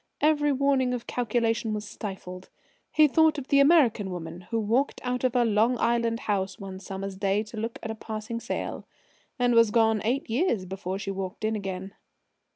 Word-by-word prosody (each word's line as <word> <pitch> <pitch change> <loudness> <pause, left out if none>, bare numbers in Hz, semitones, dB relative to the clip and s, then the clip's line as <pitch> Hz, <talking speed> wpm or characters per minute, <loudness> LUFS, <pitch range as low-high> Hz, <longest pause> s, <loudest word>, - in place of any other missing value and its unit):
Every 295 -1 +3
warning 270 -2 +2
of 240 - -6
calculation 230 -2 0
was 210 0 -5
stifled. 185 -3 -7 0.4
He 310 -1 +5
thought 315 +2 +4
of 280 -2 -6
the 280 - +5
American 275 - +4
woman 175 0 -7
who 230 - 0
walked 230 +6 +1
out 250 0 -2
of 255 -1 +1
her 245 -1 +4
Long 225 +3 +3
Island 235 -1 +1
house 195 -2 -1
one 190 -2 -8
summer's 195 0 -6
day 200 +1 +1
to 220 +1 -11
look 230 +4 -3
at 225 - -3
a - - -3
passing 220 +1 -5
sail - - -4 0.5
and 245 -1 +2
was 230 -1 +6
gone 220 -1 +3
eight 250 +5 0
years 230 - 0
before 190 0 -4
she 195 0 -4
walked 190 +2 -4
in 220 0 0
again. 195 -1 -5
225 Hz, 185 wpm, -27 LUFS, 195-250 Hz, 0.5 s, was